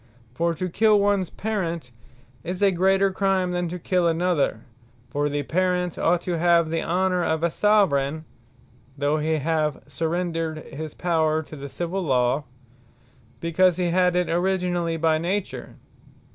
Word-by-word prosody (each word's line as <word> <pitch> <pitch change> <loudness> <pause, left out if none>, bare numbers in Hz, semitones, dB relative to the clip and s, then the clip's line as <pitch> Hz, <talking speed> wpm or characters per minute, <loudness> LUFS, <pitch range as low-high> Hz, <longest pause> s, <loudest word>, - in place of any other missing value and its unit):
For 170 +5 0
to 185 +2 -3
kill 210 +3 +3
ones 200 -3 +1
Parent, 170 - -3 0.5
is 180 +3 -3
a 200 - +5
greater 190 +2 +2
Crime, 190 -1 +1
than 175 0 -1
to 175 +2 -5
kill 180 0 +1
another: 165 -8 +1 0.5
for 145 +1 0
the 145 0 -2
Parent 180 +2 0
ought 175 +1 +1
to 175 -2 -2
have 170 -1 +3
the 165 - 0
honour 180 +1 0
of 160 0 -1
a 170 - +2
Soveraign, 160 -8 +2 0.7
(though 145 +2 +1
he 155 +1 0
have 155 -1 -1
surrendred 165 -1 -3
his 155 +1 -6
Power 160 -2 +1
to 155 - -11
the 140 -1 -8
Civill 175 +6 -3
Law,) 130 -2 +1 1.0
because 175 +1 +2
he 175 -2 0
had 180 0 +2
it 180 0 +1
originally 175 -1 0
by 160 -1 +2
Nature. 185 +4 -3
170 Hz, 150 wpm, -24 LUFS, 160-185 Hz, 1.0 s, a